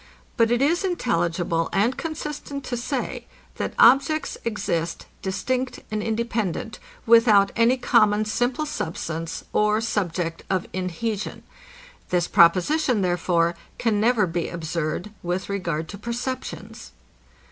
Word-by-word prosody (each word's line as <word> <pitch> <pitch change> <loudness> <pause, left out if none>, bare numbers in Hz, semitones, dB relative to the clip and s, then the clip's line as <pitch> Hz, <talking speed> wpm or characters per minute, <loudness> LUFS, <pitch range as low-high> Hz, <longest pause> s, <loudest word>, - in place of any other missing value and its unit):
But 230 -3 +3
it 240 +2 +2
is 335 +6 +2
intelligible 175 - 0
and 230 +6 +2
consistent 300 -3 -5
to 245 - -3
say, 235 - -3 0.3
that - - -3
objects 275 +6 +4
exist 175 -7 -2 0.2
distinct 255 +7 -2
and 215 0 -1
independent, 220 -4 -2 0.3
without 225 -4 +6
any 235 +3 +4
common 215 -4 +3
simple 245 +7 0
substance 165 - -4
or 210 0 +3
subject 175 -7 -2
of 185 -2 0
inhesion. 190 +4 -3 0.7
This 175 -1 +1
proposition, 210 - +4
therefore, 175 -1 +1 0.2
can 215 -3 +1
never 225 -2 +3
be 170 -1 -2
absurd 165 +3 -3
with 180 +2 -3
regard 170 -5 -2
to 200 - -8
perceptions. 240 +3 -5
210 Hz, 115 wpm, -24 LUFS, 175-245 Hz, 0.7 s, without